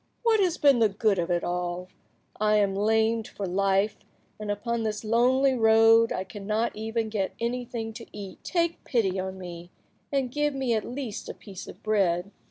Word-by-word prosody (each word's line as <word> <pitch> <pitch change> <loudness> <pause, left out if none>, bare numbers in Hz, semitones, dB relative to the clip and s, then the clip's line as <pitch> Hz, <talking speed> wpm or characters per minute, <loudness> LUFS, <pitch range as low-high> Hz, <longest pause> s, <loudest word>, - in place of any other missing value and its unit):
What 455 -2 +4
has 360 -3 +2
been 280 -4 +5
the 220 -2 +4
good 205 -1 +1
of 170 +1 -1
it 175 -1 +1
all? 180 0 -3 0.5
I 215 0 +3
am 200 -2 +3
lamed 220 +2 +2
for 200 - -5
life, 195 +2 +1 0.4
and 210 -1 -5
upon 230 +3 -1
this 215 -1 -2
lonely 255 +5 +3
road 225 -1 +5
I 185 - -1
cannot 210 +4 -2
even 225 +1 -2
get 205 -3 -2
anything 235 -1 -3
to 230 +1 -9
eat. 200 -2 -9
Take 340 -2 -1
pity 195 -6 0
on 190 0 -4
me, 175 -1 -8 0.4
and 270 -3 0
give 295 +1 0
me 260 -3 0
at 215 -2 0
least 245 -4 -5
a - - -6
piece 195 -3 -10
of - - -12
bread." 195 -3 +1
220 Hz, 180 wpm, -27 LUFS, 195-235 Hz, 0.5 s, been